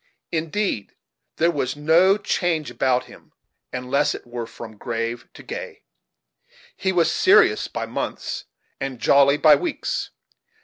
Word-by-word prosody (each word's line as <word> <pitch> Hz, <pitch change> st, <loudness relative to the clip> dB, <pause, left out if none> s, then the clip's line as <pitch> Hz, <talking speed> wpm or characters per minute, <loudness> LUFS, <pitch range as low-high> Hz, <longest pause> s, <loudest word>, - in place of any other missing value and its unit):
In 165 Hz, -1 st, -2 dB
deed 195 Hz, -, -2 dB, 0.4 s
there 170 Hz, +2 st, +2 dB
was 135 Hz, -4 st, -2 dB
no 165 Hz, +7 st, +4 dB
change 165 Hz, -8 st, -1 dB
about 125 Hz, +1 st, +1 dB
him, -, -, -17 dB, 0.4 s
unless 130 Hz, +3 st, 0 dB
it -, -, -10 dB
were 120 Hz, -1 st, -6 dB
from 110 Hz, -1 st, -10 dB
grave 115 Hz, 0 st, -4 dB
to -, -, -12 dB
gay. -, -, -7 dB, 0.9 s
He 190 Hz, -, -1 dB
was 170 Hz, -3 st, +2 dB
serious 420 Hz, +4 st, +4 dB
by -, -, -4 dB
months, -, -, -4 dB, 0.3 s
and 135 Hz, -2 st, -4 dB
jolly 140 Hz, +4 st, +4 dB
by 155 Hz, 0 st, +7 dB
weeks. 345 Hz, -4 st, -3 dB
145 Hz, 135 wpm, -23 LUFS, 125-170 Hz, 0.9 s, by